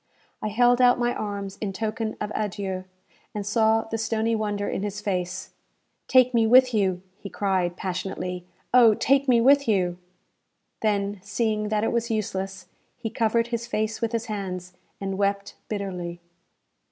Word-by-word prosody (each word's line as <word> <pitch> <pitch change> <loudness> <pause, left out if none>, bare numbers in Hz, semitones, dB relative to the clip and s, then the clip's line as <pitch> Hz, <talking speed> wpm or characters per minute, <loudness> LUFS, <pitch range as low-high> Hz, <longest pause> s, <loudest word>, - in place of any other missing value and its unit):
I - - -2
held 245 +3 +4
out 245 0 +6
my 240 0 +1
arms 200 -2 -5
in 200 -3 -2
token 220 +2 -3
of 210 0 -3
adieu, 190 -3 -3 0.5
and 205 -1 -3
saw 220 +1 +3
the 225 0 -4
stony 225 +1 0
wonder 205 -2 -2
in - - -2
his 205 0 -3
face. 185 -2 -3 0.6
"Take 255 -1 +5
me 230 -1 +4
with 250 +1 +6
you!" 190 -4 +1 0.2
he 200 - -7
cried, 185 -3 0
passionately; 180 -1 -4 0.3
"Oh, 235 -4 +7
take 275 +4 +2
me 245 -2 +5
with 280 +2 +5
you!" 180 -4 +1 0.8
Then, 205 -2 0
seeing 215 +1 -1
that 215 0 +1
it - - +1
was 235 0 -1
useless, 195 -3 -3 0.3
he 230 -3 -4
covered 230 +1 +1
his 235 0 -3
face 220 -1 -2
with 230 -1 0
his 230 -1 -2
hands, 185 -4 -5 0.3
and 195 0 -3
wept 200 0 0
bitterly. 180 -4 -4
210 Hz, 160 wpm, -25 LUFS, 195-230 Hz, 0.8 s, Oh